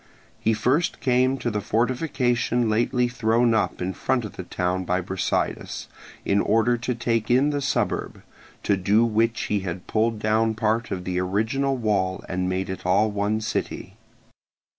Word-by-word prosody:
He 110 - +2
first 130 +10 +1
came 130 +1 +2
to 120 -2 -2
the 105 -1 -2
fortification 120 0 0
lately 120 +3 +2
thrown 120 0 +2
up 110 -4 0
in 95 +1 -2
front 125 +3 -1
of 105 - -8
the - - -5
town 90 +1 -2
by 90 0 0
Brasidas 95 +1 -2 0.4
in 100 +1 +2
order 115 +3 +2
to 120 +1 -3
take 115 -1 -1
in 130 +4 +4
the 145 -1 -1
suburb, 135 - -1 0.4
to 100 - +2
do 100 +5 +3
which 115 0 +1
he 105 - 0
had 90 -2 -5
pulled 115 +1 0
down 110 +1 +1
part 110 +1 0
of 95 -2 -4
the 90 0 -2
original 110 +9 0
wall 100 -5 0
and 90 0 -1
made 95 +1 -1
it 95 -1 -6
all 100 +4 +3
one 105 +2 -1
city. 110 - -4
110 Hz, 165 wpm, -24 LUFS, 95-120 Hz, 0.4 s, in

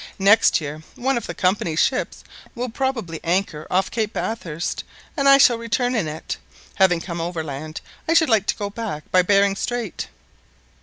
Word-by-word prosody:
Next 200 +2 +5
year 150 0 -6
one 265 +2 0
of 235 - -3
the - - -5
Company's 180 -4 0
ships 260 - 0 0.3
will 245 +1 -3
probably 230 - -2
anchor 170 -3 -1
off 185 +1 +1
Cape 220 -2 -1
Bathurst, 170 -7 -3 0.3
and 275 -3 +3
I 275 - +9
shall 240 -4 +5
return 245 +2 0
in 215 -10 0
it. 155 +2 -5 0.4
Having 185 -4 +4
come 170 -1 -5
overland, 155 -2 -5 0.3
I 330 - +2
should 320 -1 +5
like 220 -4 +2
to - - +2
go 200 -1 -4
back 205 -9 -5
by 185 - +6
Behring 200 +1 +3
Strait." 240 +3 -3
200 Hz, 170 wpm, -22 LUFS, 165-235 Hz, 0.4 s, I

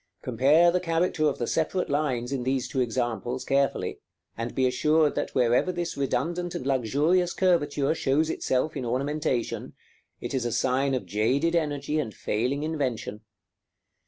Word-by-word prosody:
Compare 140 +8 +4
the 180 - +1
character 165 -2 +1
of 145 - 0
the 120 - -2
separate 165 +7 0
lines 135 -4 -1
in 135 -2 -1
these 130 +1 -1
two 130 - -1
examples 120 0 -2
carefully, 140 0 0 0.4
and 115 +1 -5
be 130 - +2
assured 150 +4 +3
that - - -3
wherever 125 +8 +3
this 175 -1 -3
redundant 160 +6 -2
and - - -4
luxurious 145 +8 +1
curvature 155 -6 +2
shows 155 0 +1
itself 155 0 -1
in 135 - -3
ornamentation, 135 +1 -2 0.4
it - - -5
is 130 -2 0
a 120 - -2
sign 130 +3 +1
of 125 - -3
jaded 130 +11 +1
energy 150 -2 -1
and 115 -8 -4
failing 125 +7 -1
invention. 130 -9 -3
140 Hz, 155 wpm, -26 LUFS, 125-160 Hz, 0.4 s, Compare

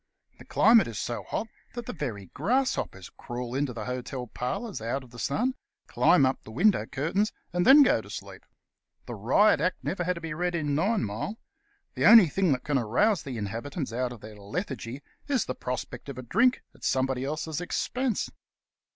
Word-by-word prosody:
The - - -13
climate 225 -1 +5
is 115 -3 -6
so 120 - -3
hot 220 - -2 0.3
that 240 -1 -5
the - - -5
very 120 - -4
grasshoppers 200 - -1
crawl 120 0 -6
into 135 0 0
the 110 -3 -6
hotel 125 0 -4
parlours 125 - -4
out 120 +4 -2
of 125 - -16
the 120 - -11
sun, 235 - 0 0.3
climb 160 -6 +4
up 130 0 0
the - - -13
window 190 - +2
curtains, 165 +10 0 0.2
and 175 0 +1
then 285 +2 +10
go 265 - +3
to - - -14
sleep. - - -8 0.6
The - - -6
Riot 210 -7 +3
Act 180 +3 -1
never 180 -1 -2
had 180 +1 0
to - - -6
be 165 -2 -4
read 175 +2 -1
in 150 -3 -1
Ninemile. 180 - -1 0.6
The - - +3
only 220 -8 +9
thing 185 +2 +1
that 125 - -3
can 145 -3 +1
arouse 160 - +2
the 130 -4 -6
inhabitants 115 - -4
out 125 +1 -1
of 120 -3 -10
their 110 0 -10
lethargy 130 - -5 0.2
is 275 -5 +1
the 130 - -3
prospect 125 +1 -5
of 135 - -7
a 130 - -6
drink 235 - +2
at - - -20
somebody 130 -1 0
else's 155 +3 -3
expense. 250 +6 -1
145 Hz, 190 wpm, -28 LUFS, 125-195 Hz, 0.6 s, then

